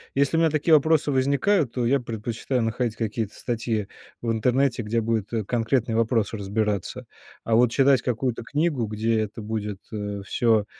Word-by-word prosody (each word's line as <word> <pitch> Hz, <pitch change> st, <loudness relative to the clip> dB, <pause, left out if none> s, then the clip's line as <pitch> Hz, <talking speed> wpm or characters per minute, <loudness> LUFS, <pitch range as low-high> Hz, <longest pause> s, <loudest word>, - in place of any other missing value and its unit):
Если 140 Hz, +3 st, +2 dB
у -, -, +3 dB
меня 165 Hz, -1 st, +4 dB
такие 155 Hz, +2 st, +2 dB
вопросы 155 Hz, 0 st, +4 dB
возникают, 140 Hz, -, +2 dB
то 125 Hz, -2 st, -1 dB
я 135 Hz, +3 st, +3 dB
предпочитаю 115 Hz, +2 st, -3 dB
находить 115 Hz, 0 st, -1 dB
какие-то 110 Hz, -1 st, -3 dB
статьи 115 Hz, -3 st, -2 dB, 0.4 s
в 115 Hz, -, 0 dB
интернете, 125 Hz, +2 st, +1 dB
где 115 Hz, +2 st, -1 dB
будет, 110 Hz, -2 st, -1 dB
э, 110 Hz, -2 st, -1 dB
конкретный 120 Hz, +1 st, 0 dB
вопрос 115 Hz, -1 st, +1 dB
разбираться. 105 Hz, -1 st, -2 dB, 0.4 s
А 115 Hz, -, -1 dB
вот 120 Hz, +1 st, +5 dB
читать 135 Hz, -1 st, +4 dB
какую-то 125 Hz, 0 st, -2 dB
книгу, 145 Hz, -4 st, 0 dB
где 110 Hz, +1 st, 0 dB
это 110 Hz, 0 st, -4 dB
будет, 105 Hz, -2 st, -4 dB
э, 105 Hz, -2 st, -4 dB
всё 110 Hz, -1 st, +2 dB
115 Hz, 165 wpm, -24 LUFS, 110-130 Hz, 0.4 s, вот